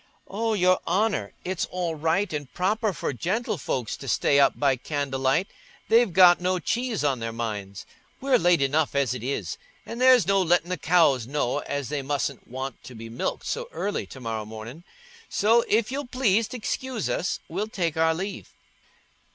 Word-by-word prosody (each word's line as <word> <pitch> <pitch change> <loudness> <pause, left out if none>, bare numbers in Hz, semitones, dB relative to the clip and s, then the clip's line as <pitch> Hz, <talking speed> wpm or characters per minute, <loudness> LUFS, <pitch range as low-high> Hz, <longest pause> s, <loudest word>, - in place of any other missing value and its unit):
"Oh, 225 +3 -1
Your 185 -1 +3
Honour, 190 - 0
it's 185 -1 -2
all 180 -2 -2
right 165 +5 0
and 145 -3 -5
proper 210 +4 +1
for 165 - -3
gentlefolks 165 - -2
to 135 - -10
stay 140 +2 +3
up 140 - +3
by 140 -2 +3
candlelight—they've 145 - 0
got 175 0 +7
no 185 +1 +1
cheese 235 +2 -1
on 135 -4 +1
their 115 0 -3
minds. 105 -4 -5 0.3
We're 265 -2 +3
late 175 -6 +3
enough 145 +2 +1
as 135 -4 +1
it 125 - -6
is, 135 +4 -3 0.3
an' 230 - -7
there's 255 -5 +6
no 195 +1 +3
lettin' 175 0 +2
the 180 - -1
cows 150 -8 +3
know 145 -1 -1
as 140 -3 -4
they 150 -2 -2
mustn't 140 -1 -3
want 130 0 -6
to 125 - -10
be 115 0 -9
milked 115 - -3
so 485 +1 -3
early 205 - -3
to 130 - -11
morrow 115 -3 -3
mornin'. 110 +8 -9 0.5
So, 230 +3 +3
if 220 +2 +1
you'll 280 0 -3
please 230 -4 +2
t' 250 - -6
excuse 245 0 -3
us, 180 - -1
we'll 195 +6 -3
take 175 -7 -2
our 160 0 +2
leave." 195 +4 -5
165 Hz, 175 wpm, -25 LUFS, 135-205 Hz, 0.5 s, got